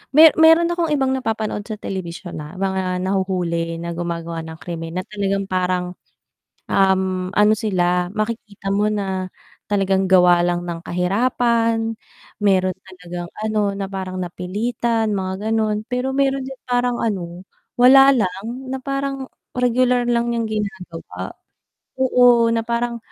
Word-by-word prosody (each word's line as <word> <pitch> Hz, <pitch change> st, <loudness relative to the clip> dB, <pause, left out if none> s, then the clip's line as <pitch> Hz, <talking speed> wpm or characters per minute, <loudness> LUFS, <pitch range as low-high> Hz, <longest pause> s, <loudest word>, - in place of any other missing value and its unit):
me 320 Hz, +1 st, +10 dB
meron 325 Hz, +1 st, +6 dB
akong 345 Hz, -1 st, 0 dB
ibang 270 Hz, -2 st, +1 dB
napapanood 220 Hz, -4 st, -2 dB
sa 220 Hz, -, -4 dB
telebisyon 175 Hz, -1 st, -6 dB
na 150 Hz, +5 st, -9 dB
mga 190 Hz, -1 st, -1 dB
nahuhuli 180 Hz, -3 st, -1 dB
na 170 Hz, 0 st, -4 dB
gumagawa 170 Hz, -1 st, -4 dB
ng 160 Hz, 0 st, -8 dB
krimen 165 Hz, -1 st, -6 dB
na -, -, -4 dB
talagang 200 Hz, -1 st, -1 dB
parang, 180 Hz, -1 st, 0 dB, 0.8 s
um, 190 Hz, -1 st, +1 dB
ano 210 Hz, +1 st, +4 dB
sila, 180 Hz, -4 st, 0 dB
makikita 215 Hz, -2 st, -4 dB
mo 205 Hz, +1 st, +2 dB
na, 190 Hz, -2 st, -2 dB, 0.4 s
talagang 195 Hz, -2 st, +1 dB
gawa 180 Hz, -2 st, +6 dB
lang 175 Hz, 0 st, 0 dB
ng 170 Hz, -1 st, -5 dB
kahirapan. 225 Hz, +5 st, +1 dB, 0.5 s
Meron 185 Hz, -2 st, +3 dB
talagang 175 Hz, -2 st, -8 dB
ano 210 Hz, -2 st, -1 dB
na 200 Hz, -, -3 dB
parang 190 Hz, -1 st, -5 dB
napilitan, 220 Hz, +5 st, -1 dB
mga 190 Hz, +1 st, -3 dB
ganun, 215 Hz, -1 st, 0 dB
pero 250 Hz, +2 st, -1 dB
meron 275 Hz, -1 st, +2 dB
din 265 Hz, 0 st, -7 dB
parang 245 Hz, 0 st, +1 dB
ano, 180 Hz, -4 st, -3 dB, 0.3 s
wala 270 Hz, +2 st, +8 dB
lang, 190 Hz, -2 st, -1 dB, 0.3 s
na 265 Hz, -, -3 dB
parang, 275 Hz, -1 st, -3 dB, 0.3 s
regular 250 Hz, 0 st, +2 dB
lang 235 Hz, 0 st, +1 dB
yung 230 Hz, -, 0 dB
ginagawa, 180 Hz, -, -5 dB, 0.7 s
oo 245 Hz, -2 st, +5 dB
na 230 Hz, 0 st, 0 dB
parang 235 Hz, 0 st, -1 dB
200 Hz, 135 wpm, -21 LUFS, 180-235 Hz, 0.8 s, me